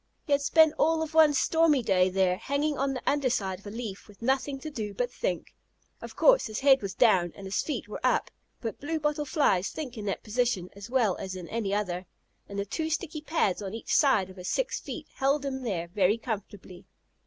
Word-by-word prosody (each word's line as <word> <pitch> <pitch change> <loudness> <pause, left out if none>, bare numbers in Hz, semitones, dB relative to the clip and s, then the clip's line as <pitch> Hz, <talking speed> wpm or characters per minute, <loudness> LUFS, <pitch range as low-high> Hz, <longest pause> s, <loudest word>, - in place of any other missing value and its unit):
He 295 - -7
had 280 0 +4
spent 315 +2 +5
all 320 +1 +3
of 315 0 -6
one 315 -2 +7
stormy 300 -1 +3
day 185 -3 +3
there, 185 -1 +2
hanging 285 +7 -1
on 270 0 -1
the 255 - -5
under 280 -2 +2
side 190 -6 -1
of 205 - -13
a - - -4
leaf, 215 -3 -6
with 210 +1 -15
nothing 270 +2 0
to 310 - -6
do 210 -6 -5
but 245 +3 -1
think. - - -3 0.5
Of - - -9
course, - - +5
his 215 +2 -5
head 270 -1 +6
was 195 -2 -5
down 185 -7 +4
and 195 - -10
his 190 0 0
feet 300 - -4
were - - -6
up, - - +1 0.3
but 225 -2 -4
Blue 320 +3 -2
bottle 300 0 -1
Flies 230 - +2
think 255 -7 -6
in 210 - -6
that 195 - -3
position 215 -5 -1
as 200 +3 -9
well 240 -7 +2
as 190 -1 -5
in 180 -2 -7
any 220 -4 -2
other, 185 -3 -2 0.4
and 200 - -6
the 200 - -1
two 315 - -3
sticky 315 -1 -3
pads 300 - 0
on 195 +1 -5
each 225 - -4
side 200 -10 +3
of 185 - -16
his 180 0 -5
six - - -1
feet - - -7
held 275 +1 +1
him 265 -1 -3
there 185 -9 -2
very 200 +3 +2
comfortably. 205 -5 -7
235 Hz, 225 wpm, -28 LUFS, 195-290 Hz, 0.5 s, one